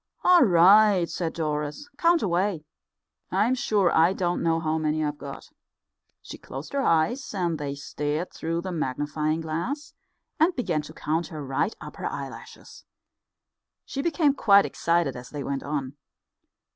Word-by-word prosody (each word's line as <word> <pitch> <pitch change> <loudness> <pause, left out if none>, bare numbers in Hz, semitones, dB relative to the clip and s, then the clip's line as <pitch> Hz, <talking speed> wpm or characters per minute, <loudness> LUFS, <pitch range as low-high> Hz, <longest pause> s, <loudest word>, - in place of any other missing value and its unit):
"All 360 -1 +6
right," 190 0 +6
said 165 -1 -3
Doris, 150 - -3
"count 340 +1 +3
away. 180 -2 0 0.7
I'm 210 +7 +2
sure 210 -7 +1
I 165 +3 +5
don't 175 -2 -1
know 165 -1 +1
how 160 -1 -1
many 155 0 0
I've 150 0 -4
got." 140 -1 -8 0.8
She - - -9
closed - - -8
her 280 - +1
eyes, 240 +7 +1
and 170 -4 -1
they 140 -1 -4
stared 150 +4 -3
through 165 +1 -3
the 185 +1 -5
magnifying 150 +1 -2
glass, 175 - -4 0.5
and 335 +4 +3
began 175 - -1
to 150 +1 -11
count 160 +1 -2
her 150 -3 -7
right 135 +10 -1
upper - - -6
eyelashes. - - -8 1.0
She 275 - -4
became 305 -2 +2
quite 200 -7 +5
excited 165 -5 0
as 125 0 -9
they 145 -2 -5
went 140 0 -3
on. 140 -2 -3
165 Hz, 150 wpm, -26 LUFS, 150-205 Hz, 1.0 s, All